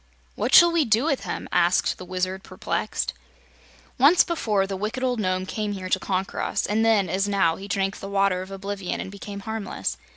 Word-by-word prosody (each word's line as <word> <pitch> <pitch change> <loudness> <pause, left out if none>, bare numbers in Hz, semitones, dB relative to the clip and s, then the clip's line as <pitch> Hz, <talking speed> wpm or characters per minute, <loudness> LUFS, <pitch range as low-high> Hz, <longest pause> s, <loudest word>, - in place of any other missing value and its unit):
"What - - -2
shall 345 0 +9
we 335 -2 +3
do 225 -1 +2
with 300 -5 0
him?" - - -4
asked 175 0 +2
the 185 - -8
Wizard, 185 +1 -2
perplexed. - - -3 0.9
"Once 295 +7 +7
before 215 - 0
the 195 0 -4
wicked 215 +6 -3
old 250 -2 0
Nome 185 -2 0
came 210 +1 -3
here 185 -2 -6
to 185 - +2
conquer 190 0 -2
us, - - -1
and 215 +2 +1
then, 220 -4 +3
as 190 +4 0
now, 190 -5 +2
he 195 - -9
drank 195 -1 0
of - - -12
the 195 - -6
Water 195 -2 +1
of 185 - -8
Oblivion 195 -1 -4
and 190 - -5
became 200 0 -8
harmless. 220 -2 -4
200 Hz, 205 wpm, -24 LUFS, 185-220 Hz, 0.9 s, shall